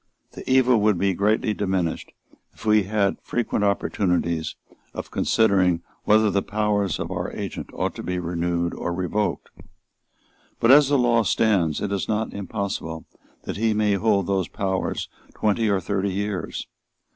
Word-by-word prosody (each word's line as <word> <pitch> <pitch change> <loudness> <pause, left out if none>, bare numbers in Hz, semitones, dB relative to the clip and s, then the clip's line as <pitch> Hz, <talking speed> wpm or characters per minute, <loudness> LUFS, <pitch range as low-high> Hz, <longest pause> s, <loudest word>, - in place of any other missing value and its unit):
The - - -9
evil 130 -3 +4
would 105 -2 +3
be 95 +1 +1
greatly 105 +4 +1
diminished 95 -5 -2 0.4
if - - -13
we 105 -2 +4
had 100 -1 +1
frequent 120 -3 -1
opportunities 90 -5 0 0.4
of - - -6
considering 95 -6 +2 0.2
whether 110 0 +4
the 100 - +1
powers 105 -3 0
of - - -4
our - - -3
agent - - -5
ought - - -2
to - - -5
be 90 0 -3
renewed 85 0 -1
or 85 - -3
revoked. 95 +4 -2 1.1
But, 115 - +5
as 140 0 +7
the 145 - +3
law 120 -2 +3
stands, 95 -9 +1
it 100 - -2
is 100 -2 -2
not 110 0 -1
impossible 100 -5 -4 0.4
that - - -5
he 110 0 +1
may 105 -1 +2
hold 100 -1 +2
those 95 -2 0
powers 95 -1 -2 0.3
twenty 110 +1 +1
or 100 -1 +2
thirty 100 +2 -1
years. 100 -1 -3
100 Hz, 155 wpm, -24 LUFS, 90-110 Hz, 1.1 s, as